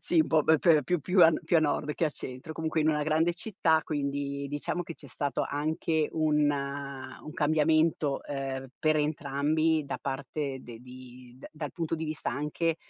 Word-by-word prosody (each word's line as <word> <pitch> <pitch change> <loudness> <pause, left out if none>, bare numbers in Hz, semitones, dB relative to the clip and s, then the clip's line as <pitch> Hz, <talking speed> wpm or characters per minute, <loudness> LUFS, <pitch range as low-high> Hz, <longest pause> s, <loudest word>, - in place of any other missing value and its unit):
Sì, 170 -2 +3
un - - +2
po' 155 -2 +4
pe 160 -1 +5
pe 155 -4 +5
più 175 +2 0
più 180 +4 +4
a 165 - +9
n 160 - -2
più 170 - +2
a - - +5
nord 150 -1 0
che 170 - 0
a 155 - +1
centro, 130 +3 -7
comunque 160 0 -1
in 155 - +2
una 150 -1 +2
grande 160 +3 +2
città, 170 -5 +1
quindi, 140 -1 -2
diciamo 145 +4 -2
che 165 - -8
c'è 145 - -13
stato 140 0 -2
anche 155 +1 0
un 150 -2 +2
un 140 0 -5
cambiamento, 155 -1 +2
uhm, 135 -2 -3
per 155 0 +2
entrambi 155 +1 +1
da - - -4
parte 140 0 -3
de 120 -2 -10
di 125 0 -13
d - - -10
dal 150 -2 -6
punto 165 -2 -2
di 160 0 -3
vista 155 0 -3
anche 150 +4 -1
150 Hz, 195 wpm, -29 LUFS, 140-160 Hz, -, a